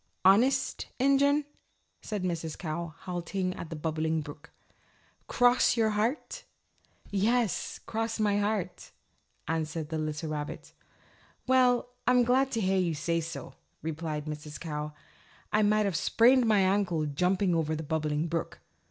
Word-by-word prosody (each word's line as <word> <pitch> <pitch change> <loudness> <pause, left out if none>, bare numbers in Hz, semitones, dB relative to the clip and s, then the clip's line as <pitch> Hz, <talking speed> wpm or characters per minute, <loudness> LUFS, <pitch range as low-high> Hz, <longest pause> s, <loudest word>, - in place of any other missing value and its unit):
"Honest 255 +8 +3
Injun?" 280 +2 +3 0.6
said 210 -4 -4
Mrs. 165 -3 -3
Cow, 165 -1 -4
halting 180 +1 -3
at 170 - -8
the 165 - -5
Bubbling 160 +1 -1
Brook. 145 0 -10 0.8
"Cross 245 0 +4
your 220 -1 +3
heart?" 235 - -2 0.7
"Yes, 220 +2 +1
cross 225 0 -3
my 205 -1 +2
heart," 205 -3 -2 0.5
answered 160 -1 -2
the 160 -1 -2
little 155 0 -3
rabbit. 150 -1 -5 0.7
"Well, 250 -1 +3 0.2
I'm 250 -1 +5
glad 260 +3 +3
to 225 - 0
hear 190 -1 +2
you 170 -3 0
say 165 +3 0
so," 165 +1 -7 0.3
replied 155 -1 -3
Mrs. 150 -1 -7
Cow. 150 -2 -4 0.6
"I 215 - +4
might 210 0 +3
have 195 -4 -1
sprained 245 +7 +4
my 210 -3 +4
ankle 185 -4 +1
jumping 180 +6 +1
over 160 -1 0
the 160 - -4
Bubbling 155 0 -1
Brook." 165 0 -3
180 Hz, 135 wpm, -29 LUFS, 160-220 Hz, 0.8 s, I'm